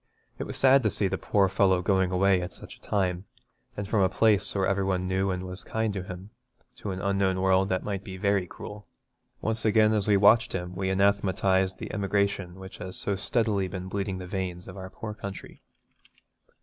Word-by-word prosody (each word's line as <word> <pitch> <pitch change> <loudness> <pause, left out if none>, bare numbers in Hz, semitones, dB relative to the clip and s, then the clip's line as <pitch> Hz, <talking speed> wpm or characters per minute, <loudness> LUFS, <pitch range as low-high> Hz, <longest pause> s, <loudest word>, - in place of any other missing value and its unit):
It - - -3
was - - -5
sad 135 +1 +6
to 110 - +2
see 100 - 0
the - - -3
poor 100 -2 +2
fellow 95 -1 +2
going 95 -1 +2
away 95 0 +3
at 90 +1 -5
such - - -10
a - - -26
time, 95 -2 -1 0.5
and 100 -1 -3
from 105 0 +1
a 95 - +4
place 105 0 +2
where 95 -1 +2
every 100 0 +1
one 95 -1 -1
knew 95 +1 0
and 90 -1 -2
was 90 0 -7
kind 110 -1 -1
to 95 - -3
him, 95 +2 -9 0.5
to 105 - -6
an 95 -1 -3
unknown 100 -1 +1
world 95 +1 +3
that 95 -1 0
might 100 -2 -3
be 95 -1 -8
very 100 -1 +1
cruel. 105 +4 -10 0.5
Once 110 0 0
again 110 0 +4
as 105 -2 0
we 105 -1 +5
watched 105 +3 +5
him 90 0 -4
we 95 0 -1
anathematised 95 -1 +2
the - - -7
emigration 100 -3 0
which 95 0 -11
has 95 0 -6
so 100 - -1
steadily 100 0 0
been 95 0 -6
bleeding 95 -1 -2
the 90 - -7
veins 90 -1 -4
of 95 - -9
our 95 -1 -7
poor 110 +2 -7
country. 100 -2 -8
95 Hz, 210 wpm, -27 LUFS, 95-100 Hz, 0.5 s, sad